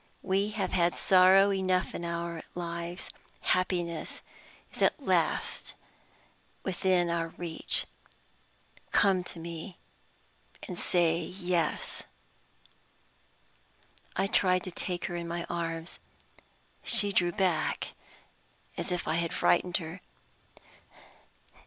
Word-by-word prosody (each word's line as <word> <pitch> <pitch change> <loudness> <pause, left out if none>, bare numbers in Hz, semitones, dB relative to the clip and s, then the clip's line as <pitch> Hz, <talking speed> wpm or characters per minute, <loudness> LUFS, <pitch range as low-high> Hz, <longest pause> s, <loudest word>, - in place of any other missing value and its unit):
We 195 +2 +2
have 210 -3 -2
had 175 -1 +2
sorrow 190 +1 +6
enough 185 -2 +1
in - - -5
our 170 -1 -3
lives. 170 +1 -4 0.3
Happiness 175 -3 -1 0.5
is - - -6
at - - +3
last - - 0 0.9
within 180 -2 +1
our 165 -1 0
reach. 170 -2 0 1.0
Come 190 -3 +3
to - - -7
me, 170 +2 -7 0.9
and 180 - -5
say 170 -2 +3
Yes." 180 -4 -1 2.1
I 190 - +2
tried 185 -2 +3
to 185 - -6
take 175 0 -2
her 175 - -3
in 170 0 -4
my 170 0 -3
arms. 165 -1 -3 0.8
She 205 -1 +4
drew 175 -2 +3
back 185 -4 0 0.9
as - - -3
if 180 -1 -2
I 155 - +1
had 170 -1 0
frightened 175 0 +3
her. 160 -2 -7
175 Hz, 105 wpm, -30 LUFS, 170-185 Hz, 2.1 s, sorrow